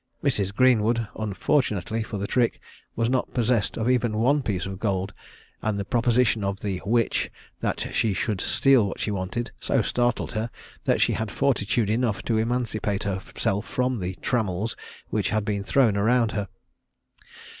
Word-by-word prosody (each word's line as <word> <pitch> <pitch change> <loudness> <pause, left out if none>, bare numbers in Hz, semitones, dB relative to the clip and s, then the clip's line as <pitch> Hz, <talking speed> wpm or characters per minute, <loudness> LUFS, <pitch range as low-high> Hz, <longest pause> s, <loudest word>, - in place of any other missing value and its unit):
Mrs. 105 -9 +1
Greenwood, 115 -1 +3
unfortunately 110 - 0
for 110 -1 -4
the 100 - -2
trick, 120 +2 +1 0.4
was 115 0 +1
not 130 +1 -1
possessed 120 -3 +1
of 115 - -1
even 120 -4 +2
one 140 +6 +3
piece 100 -8 -2
of 95 0 -6
gold, 100 -2 -1 0.5
and 110 -2 -1
the 100 - -3
proposition 120 -1 +2
of 100 0 -2
the 95 -3 -2
"witch," 115 +1 +1 0.3
that - - -2
she 110 - +2
should 100 0 -1
steal 135 -6 +4
what - - -6
she 105 - -1
wanted, 100 +5 -3
so - - +1
startled 120 -1 0
her, 115 +1 -2 0.4
that - - +2
she - - +3
had 110 -1 -2
fortitude 115 -4 +1
enough 115 -2 0
to 110 -2 +1
emancipate 110 -3 -1
herself 100 +1 -2
from 125 -1 0
the 90 0 -3
trammels 110 -2 0 0.4
which - - +1
had 110 -1 0
been 100 -2 -1
thrown 115 -1 +3
round 115 +2 +3
her. 105 -2 -2
110 Hz, 165 wpm, -25 LUFS, 100-120 Hz, 0.5 s, steal